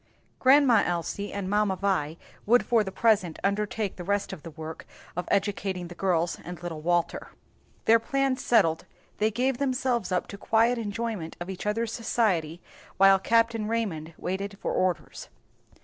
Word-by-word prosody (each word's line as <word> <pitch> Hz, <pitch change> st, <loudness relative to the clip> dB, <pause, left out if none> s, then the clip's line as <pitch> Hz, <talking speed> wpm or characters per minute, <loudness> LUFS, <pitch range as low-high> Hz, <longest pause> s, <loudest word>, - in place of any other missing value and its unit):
Grandma 260 Hz, -4 st, +6 dB
Elsie 175 Hz, +4 st, -3 dB
and 200 Hz, -2 st, -4 dB
Mamma 205 Hz, -1 st, +1 dB
Vi 180 Hz, -5 st, -1 dB, 0.3 s
would 245 Hz, +3 st, +4 dB
for 230 Hz, -3 st, +3 dB
the 190 Hz, -, -5 dB
present 195 Hz, -7 st, +2 dB
undertake 205 Hz, 0 st, -1 dB
the 180 Hz, -, -6 dB
rest 200 Hz, +2 st, -1 dB
of -, -, -8 dB
the 165 Hz, -, -8 dB
work 160 Hz, 0 st, -8 dB, 0.3 s
of 180 Hz, 0 st, -3 dB
educating 195 Hz, -3 st, -1 dB
the -, -, -8 dB
girls 175 Hz, -2 st, 0 dB
and 175 Hz, 0 st, -8 dB
little 165 Hz, -3 st, -5 dB
Walter. 175 Hz, +1 st, 0 dB, 0.6 s
Their 230 Hz, +1 st, +6 dB
plans 275 Hz, +2 st, 0 dB
settled, 165 Hz, -9 st, +2 dB, 0.3 s
they 215 Hz, -, +3 dB
gave 250 Hz, +3 st, 0 dB
themselves 255 Hz, -5 st, 0 dB
up 180 Hz, -, 0 dB
to 200 Hz, -, -8 dB
quiet 230 Hz, +3 st, +2 dB
enjoyment 215 Hz, -5 st, -4 dB
of 175 Hz, +2 st, -5 dB
each 190 Hz, +2 st, -6 dB
other's 225 Hz, +2 st, -1 dB
society 180 Hz, -8 st, 0 dB, 0.3 s
while 195 Hz, 0 st, +6 dB
Capt. 230 Hz, +3 st, +3 dB
Raymond 210 Hz, -8 st, -3 dB
waited 195 Hz, +2 st, -4 dB
for -, -, -2 dB
orders. 185 Hz, -2 st, -2 dB
200 Hz, 160 wpm, -27 LUFS, 175-230 Hz, 0.6 s, Grandma